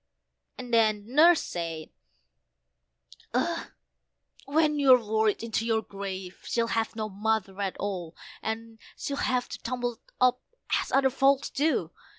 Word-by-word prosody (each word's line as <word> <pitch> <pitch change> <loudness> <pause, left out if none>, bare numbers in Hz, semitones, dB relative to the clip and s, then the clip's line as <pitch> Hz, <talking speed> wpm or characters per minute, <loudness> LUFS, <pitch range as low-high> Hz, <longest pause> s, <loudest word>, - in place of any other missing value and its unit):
and 250 -2 -7
then 215 -2 +3
Nurse 330 +3 +6
said, 165 -2 -5 1.4
"Ugh! - - 0 0.8
When 300 +1 +2
you're 265 -3 +7
worried 220 -2 0
into 225 -1 -1
your 225 -1 +1
grave, 190 -2 -7
she'll 230 -1 0
have 225 0 -1
no 215 -1 -2
mother 205 -1 -1
at 195 -2 -2
all, 180 -5 -4 0.3
and'll 225 +5 -5
have 250 -3 0
to - - -6
tumble 245 -1 -3 0.2
up 250 0 +3 0.4
as - - -7
other 270 -1 +4
folks 275 +1 +2
do. 275 - 0
225 Hz, 130 wpm, -28 LUFS, 205-255 Hz, 1.4 s, you're